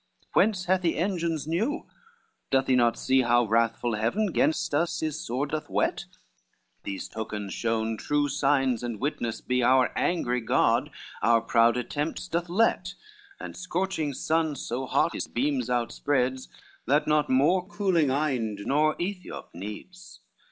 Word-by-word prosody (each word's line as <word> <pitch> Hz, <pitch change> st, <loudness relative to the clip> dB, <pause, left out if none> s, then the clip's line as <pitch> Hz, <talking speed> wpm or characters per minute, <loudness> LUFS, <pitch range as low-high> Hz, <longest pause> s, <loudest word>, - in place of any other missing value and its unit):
Whence 195 Hz, -4 st, +2 dB
hath 185 Hz, +1 st, +2 dB
he 170 Hz, -2 st, 0 dB
engines 170 Hz, -4 st, -1 dB
new? 210 Hz, -, -1 dB, 0.6 s
doth 135 Hz, -1 st, +2 dB
he 130 Hz, -, +3 dB
not 120 Hz, -2 st, +3 dB
see, 130 Hz, 0 st, +2 dB
How 120 Hz, 0 st, +3 dB
wrathful 115 Hz, +1 st, +1 dB
Heaven 180 Hz, -, 0 dB
gainst 170 Hz, 0 st, +1 dB
us 170 Hz, +4 st, 0 dB
his 155 Hz, 0 st, -3 dB
sword 135 Hz, +5 st, -2 dB
doth 155 Hz, 0 st, -3 dB
whet? -, -, 0 dB, 0.8 s
These 100 Hz, -1 st, -5 dB
tokens 105 Hz, -3 st, -5 dB
shown 115 Hz, -1 st, -1 dB
true 145 Hz, +5 st, 0 dB
signs 135 Hz, -3 st, +1 dB
and 120 Hz, -3 st, -4 dB
witness 120 Hz, -5 st, -2 dB
be 125 Hz, 0 st, 0 dB
Our 130 Hz, +1 st, +4 dB
angry 125 Hz, -8 st, 0 dB
God 110 Hz, -, +2 dB, 0.3 s
our 115 Hz, 0 st, +4 dB
proud 115 Hz, +1 st, +3 dB
attempts 145 Hz, +8 st, -3 dB
doth 170 Hz, 0 st, -2 dB
let, 225 Hz, +6 st, +1 dB, 0.4 s
And -, -, -7 dB
scorching 180 Hz, -5 st, -2 dB
sun 160 Hz, 0 st, 0 dB
so 130 Hz, 0 st, -4 dB
hot -, -, +2 dB
his -, -, -4 dB
beams 130 Hz, -1 st, -1 dB
outspreads, 130 Hz, +2 st, 0 dB, 0.4 s
That 145 Hz, +3 st, +3 dB
not 150 Hz, -1 st, +2 dB
more 175 Hz, +8 st, +3 dB
cooling 185 Hz, -8 st, +1 dB
Inde 130 Hz, -7 st, -1 dB
nor 155 Hz, +3 st, +2 dB
Aethiop 180 Hz, 0 st, -5 dB
needs. 105 Hz, -, -9 dB
140 Hz, 145 wpm, -27 LUFS, 120-165 Hz, 0.8 s, Our